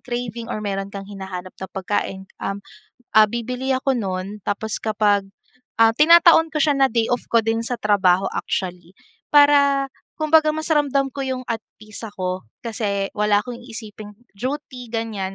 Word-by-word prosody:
craving 240 -2 -5
or 215 - -4
mayro'n 195 -1 -2
kang 200 0 -7
hinahanap 190 -2 -7
na 190 - -4
pagkain, 190 0 -2 0.2
um, 195 0 -4 0.5
ah, 215 - +9
bibili 245 +4 -2
ako 265 0 0
no'n 195 -1 -4
tapos 210 +2 -2
kapag 210 -2 +1 0.6
ah, 225 - +7
tinataon 330 +1 +7
ko - - +1
siya 295 -1 +3
na 270 -1 +5
day 230 -1 +1
off 245 - 0
ko 230 - +3
din 225 +1 0
sa - - -3
trabaho 195 -3 +3
actually. 180 -2 -3 0.4
Para, 280 -1 +5 0.3
kumbaga 310 0 +4
mas 315 0 -4
ramdam 280 -3 +2
ko 275 - -5
yung 260 -1 -2
at 225 -1 -1 0.2
peace 215 +1 -9
ako 185 - -4 0.2
kasi 205 -4 -2
wala 210 -1 +3
akong 245 +1 -7
iisiping 220 -3 -9 0.2
duty 255 +1 -5
ganyan. 215 -4 -3
225 Hz, 160 wpm, -22 LUFS, 200-265 Hz, 0.6 s, ah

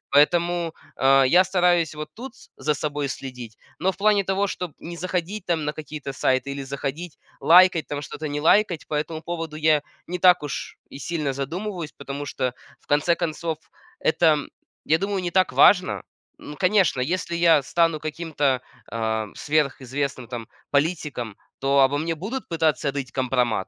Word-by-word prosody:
Поэтому, 170 +2 +3 0.2
э, 135 0 +5
я 180 +7 +6
стараюсь 175 -3 +2
вот 150 0 -6
тут 255 +2 -8 0.2
за 150 - 0
собой 145 -1 -2
следить, 125 -4 -7 0.2
но 185 +3 +2
в - - -19
плане 205 0 +3
того, 195 +1 +1
чтоб 180 -4 -5
не 170 +1 -8
заходить 185 +3 -3
там 165 -3 0
на 150 - -1
какие-то 150 -2 -7
сайты, 130 0 0
или 140 0 -5
заходить 140 +4 -5 0.2
лайкать 175 -1 +6
там 145 -1 -4
что-то, 150 +1 -7
или 145 - -3
не 145 - -2
лайкать, 175 0 +3
по - - -6
этому 155 +2 -3
поводу 165 -2 -5
я 155 -1 +3 0.3
не 180 - -3
так 180 -2 +6
уж 145 - -5
и 135 - -10
сильно 155 -3 -2
задумываюсь, 165 +5 -4
потому 140 +1 -6
что, 130 -3 -2 0.3
в - - -31
конце 150 +4 +3
концов, 165 -1 -3 0.4
это, 160 -1 +4 0.5
я 160 - +3
думаю, 195 +1 -2
не 175 - -2
так 185 0 +2
важно. 185 -2 +5 0.4
М, 150 - -8
конечно, 185 -6 +3
если 170 +5 -1
я 165 -4 +5
стану 165 +2 +1
каким-то, 150 -4 -1 0.3
э, 110 -1 -1
сверхизвестным 140 -3 -1
там 115 -1 -6 0.2
политиком, 145 - -1 0.2
то 140 +1 +2
обо 135 +1 +4
мне 165 +2 -1
будут 220 - -5
пытаться 155 -4 +1
рыть 135 -2 -5
компромат. 125 -6 0
155 Hz, 165 wpm, -24 LUFS, 140-175 Hz, 0.5 s, я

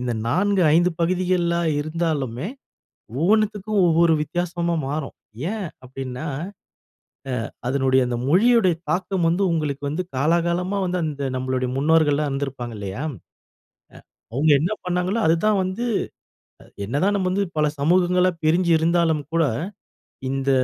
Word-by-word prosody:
இந்த 125 -1 -2
4, 195 +9 +2
5 175 +2 +4
பகுதிகளா 175 0 +1 0.2
இருந்தாலுமே, 155 -4 -2 0.7
ஒவ்வொன்னத்துக்கும் 210 +4 +1
ஒவ்வொரு 165 0 +4
வித்தியாசமா 170 +2 -1
மாறும். 145 0 -4 0.4
ஏன் 215 -3 -3 0.2
அப்டின்னா, 130 +2 -6 1.2
அ - - -12 0.2
அதனுடைய 130 0 +2
அந்த 120 -1 -2
மொழியோட 220 - +4 0.2
தாக்கம் 185 -1 0
வந்து 175 +4 +1
உங்களுக்கு 150 -4 -2
வந்து 160 +6 -2
காலாகாலமா 170 +6 +1
வந்து 180 0 -1
அந்த 145 -3 -3
நம்மளுடைய 130 0 -1
முன்னோர்கள்லாம் 150 0 +3
இருந்திருப்பாங்க 135 -4 -4
இல்லையா? 100 +5 -5
அ 110 - -17 1.0
அவங்க 150 +5 +2
என்ன 175 +7 0
பண்ணாங்களோ 180 +4 0
அதுதான் 180 +6 +3
வந்து 185 +6 -3 0.8
அ - - -16 0.2
என்னதான் 145 - +1
நம்ம 185 -2 0
வந்து 200 +2 +1
பல 150 - +3
சமூகங்களா 180 +4 +3
பிரிஞ்சி 170 +2 +3
இருந்தாலும் 165 -2 +2
கூட, 165 -1 +3 0.9
இந்த 135 0 -1
165 Hz, 120 wpm, -22 LUFS, 140-180 Hz, 1.2 s, 5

